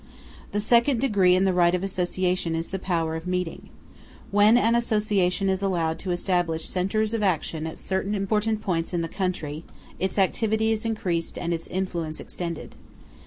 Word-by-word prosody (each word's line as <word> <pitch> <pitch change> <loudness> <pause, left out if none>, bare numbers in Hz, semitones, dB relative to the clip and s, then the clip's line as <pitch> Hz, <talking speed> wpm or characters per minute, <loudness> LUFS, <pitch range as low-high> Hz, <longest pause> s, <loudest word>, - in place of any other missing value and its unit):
The 205 - 0
second 235 +4 +3
degree 200 -8 +4
in 185 - +3
the 190 -1 +2
right 175 0 +4
of 180 - -3
association 180 -2 -1
is 165 +1 -3
the 190 - -3
power 165 -3 -1
of 160 +2 -6
meeting. 180 -2 -3 0.6
When 205 +3 +6
an 230 -1 +3
association 210 -5 +1
is 190 0 +1
allowed 170 -5 0
to 190 - -6
establish 175 -2 0
centres 210 +4 0
of 225 - 0
action 160 -4 0
at 160 - -7
certain 195 +2 -1
important 210 +2 0
points 170 -1 -1
in 170 - +1
the 165 - -2
country, 165 -5 -3 0.4
its 190 +2 -1
activity 220 +3 +2
is 220 0 0
increased 180 -7 -2
and 170 -1 -2
its 165 -1 -3
influence 170 -4 -3
extended. 170 -3 -5
185 Hz, 170 wpm, -25 LUFS, 170-210 Hz, 0.6 s, When